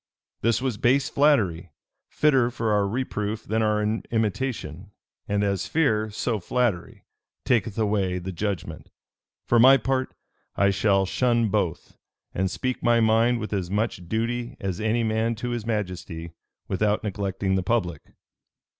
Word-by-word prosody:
This 115 +2 +1
was 130 -6 -1
base 130 +3 +2
flattery, 105 - +2 0.4
fitter 135 -5 +3
for 115 -2 -2
our 105 -1 +2
reproof 110 -2 -3
than 110 +1 -1
our 105 -1 +1 0.3
imitation; 110 - -2 0.4
and 105 0 0
as 100 -2 -1
fear, 110 -9 +1
so 110 +1 -2
flattery, 110 -2 -2 0.4
taketh 115 -4 +1
away 100 -4 0
the 90 +1 -5
judgment. 95 0 -4 0.6
For 120 - +3
my 130 +3 +8
part, 130 +2 -2 0.4
I 100 0 +3
shall 100 0 +2
shun 120 +2 +1
both; 95 -6 -2 0.4
and 95 +1 0
speak 105 +9 -3
my 120 0 +3
mind 115 +2 +3
with 110 -2 -5
as 95 -4 -2
much 100 -4 -2
duty 120 +2 -2
as 95 +1 -3
any 110 +2 +1
man 110 +1 0
to 120 +2 -4
his 120 -2 -4
majesty, 90 -6 -4 0.4
without 105 +2 0
neglecting 95 -2 -2
the 95 - +2
public. 90 -6 -1
110 Hz, 145 wpm, -25 LUFS, 95-120 Hz, 0.6 s, my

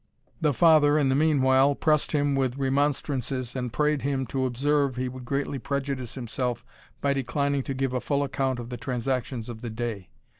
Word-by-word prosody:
The 150 -2 +3
father 150 0 +5
in 140 -3 +2
the 130 - +2
meanwhile 140 -2 +4
pressed 150 0 +1
him 145 -2 +1
with 130 -1 0
remonstrances, 135 -2 -1
and 125 -2 -3
prayed 150 +2 +1
him 135 -1 -1
to 130 -1 +1
observe, 140 +2 +1
he 130 0 -2
would 125 0 -8
greatly 140 +1 -2
prejudice 135 -1 -3
himself 125 -1 -3 0.4
by 140 0 +2
declining 140 +1 0
to 135 +1 -4
give 135 -1 -1
a 125 - -1
full 145 -1 0
account 135 -2 -1
of 120 -1 -7
the 125 - -5
transactions 125 -2 -2
of 115 -2 -8
the 120 - -4
day. 110 -4 -4
135 Hz, 185 wpm, -26 LUFS, 125-140 Hz, 0.4 s, father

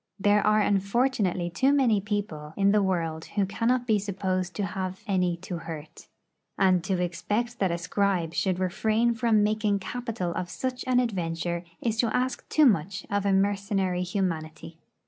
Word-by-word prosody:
There 205 +1 +4
are 215 0 +4
unfortunately 200 -3 +1
too 265 +10 +2
many 245 -8 +3
people 190 -7 -4
in 200 0 +4
the 210 0 +4
world 165 -4 -1
who 205 -2 -1
cannot 235 +5 0
be 220 -3 +2
supposed 185 -2 -2
to 205 - -1
have 185 0 -4
any 180 -4 +1
to 180 -2 -4
hurt. 160 -2 -9 0.5
And 185 -3 +3
to 190 -2 0
expect 210 +7 -2
that 190 - +2
a 170 - -1
scribe 180 -2 0
should 185 0 0
refrain 220 +6 +1
from 225 -3 +2
making 210 -1 +1
capital 225 -3 -4
of 180 +1 -4
such 255 +3 -3
an 250 -1 +4
adventure 170 -6 -2 0.2
is 225 -2 0
to 235 - +2
ask 255 +1 -2
too 310 - +5
much 195 - +1
of 200 0 0
mercenary 195 -1 +1
humanity. 165 -3 -3
195 Hz, 165 wpm, -27 LUFS, 180-215 Hz, 0.5 s, too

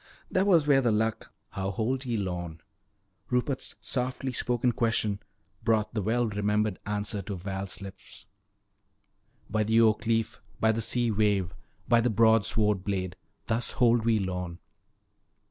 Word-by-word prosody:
"That 190 +2 +2
was 170 -6 +5
where 140 -2 +5
the 120 -3 +2
Luck 110 +1 -1
" 100 - -48
"How 95 0 -3
hold 125 +7 -1
ye 120 -2 -1
Lorne?" 85 -5 -4 0.7
Rupert's 125 +2 -1
softly 130 +1 -2
spoken 125 0 +1
question 110 -3 0 0.4
brought 110 -1 +1
the 110 - -1
well 115 +4 +1
remembered 105 -1 0
answer 105 0 -2
to 100 +1 -5
Val's 95 +2 -5
lips: 95 -1 -11 1.2
"By 110 0 0
the 110 +2 +3
oak 110 0 +3
leaf, 115 -1 0 0.2
by 110 - +4
the 115 +1 -1
sea 120 +1 +1
wave, 100 -4 +1 0.3
by 120 -1 +5
the 120 - +2
broadsword 110 -2 +3
blade, 95 -3 -2 0.3
thus 115 +2 -1
hold 120 -2 +3
we 115 -1 +3
Lorne!" 90 -3 -3
110 Hz, 145 wpm, -28 LUFS, 100-120 Hz, 1.2 s, was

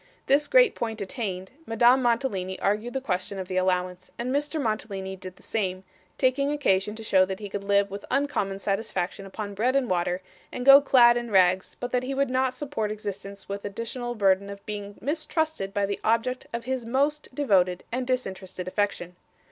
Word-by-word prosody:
This 290 +2 +3
great - - +5
point 225 -2 -4
attained, 190 -3 -4 0.2
Madame 240 +3 +5
Mantalini 230 -7 0
argued 215 +5 -1
the 265 - -1
question 195 -4 -2
of 190 -1 -5
the 185 - -3
allowance, 185 0 0
and 245 +2 -2
Mr 295 +2 -1
Mantalini 200 -5 -3
did 185 -1 -10
the - - -21
same, 185 -4 -2 0.3
taking 275 +2 +2
occasion 210 -8 +1
to 225 - -8
show 190 -3 +4
that 190 +1 -3
he 205 -2 -6
could 200 0 -4
live 200 0 +2
with 200 0 -6
uncommon 265 -8 0
satisfaction 195 -2 -2
upon 205 +1 -6
bread 240 +6 +1
and 260 -6 +1
water, 180 +1 0 0.3
and 250 - -5
go 275 +1 +10
clad 240 -4 +6
in 240 -1 -4
rags, 185 -2 +3
but 245 - -4
that 250 - +1
he 265 +2 -3
could 275 -1 +1
not 260 0 +1
support 255 -6 -3
existence 200 -1 -7
with 200 0 -4
the - - -4
additional 235 +4 -5
burden 200 -1 +2
of 200 0 -9
being 205 -1 -6
mistrusted 310 - -2
by 200 -1 0
the 200 0 -3
object 230 +3 0
of 235 0 -4
his 260 -1 -2
most 280 +6 0
devoted 185 -10 +2
and 250 +1 -2
disinterested 190 -7 -3
affection. 185 -3 -2
215 Hz, 190 wpm, -26 LUFS, 190-255 Hz, 0.3 s, go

